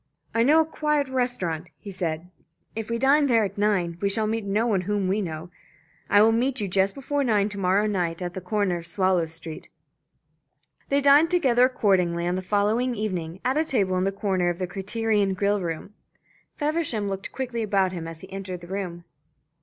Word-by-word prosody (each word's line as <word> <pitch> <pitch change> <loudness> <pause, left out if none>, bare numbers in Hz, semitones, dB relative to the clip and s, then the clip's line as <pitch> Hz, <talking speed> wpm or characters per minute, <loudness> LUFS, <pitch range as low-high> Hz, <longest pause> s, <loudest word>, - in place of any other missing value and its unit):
"I 230 - +2
know 295 +7 +5
a - - 0
quiet 300 -2 0
restaurant," 220 -11 -2
he 200 - -9
said. 175 -1 -3 0.4
"If 225 0 -5
we 230 - 0
dine 280 +4 +4
there 230 -4 +4
at 195 - -6
nine, 185 -5 0
we 200 - +2
shall 215 +2 +1
meet 220 0 -2
no 205 +3 +1
one 205 -6 +1
whom 200 +1 -1
we 200 +3 +1
know. 165 -1 -6 0.6
I 205 +1 +6
will 225 - +5
meet 250 +3 0
you 205 - -1
just 195 +1 +1
before 280 +1 -1
nine 210 -5 +2
to 205 -1 -6
morrow 195 +2 +2
night 175 -5 -1
at 175 -1 -4
the 190 - -6
corner 195 -1 0
of 170 0 -8
Swallow 185 -2 +1
Street." 165 0 -7 1.2
They 280 +1 +2
dined 285 +4 +6
together 260 -9 +4
accordingly 180 -8 +1
on 175 - 0
the 185 - -2
following 210 +6 +1
evening, 185 -5 -4
at 260 +4 +2
a - - +3
table 200 -11 0
in 185 - +1
the 195 - +1
corner 190 -3 0
of 175 - -2
the 185 - -2
Criterion 205 +1 0
grill 200 +1 +1
room. 170 +3 -5 0.6
Feversham 295 -9 -1
looked 195 0 -4
quickly 250 -3 -3
about 195 -3 +1
him 170 -3 -5
as 165 -1 -8
he 190 0 -11
entered 185 -2 -6
the 175 - -11
room. 175 -3 -4
200 Hz, 200 wpm, -25 LUFS, 180-230 Hz, 1.2 s, I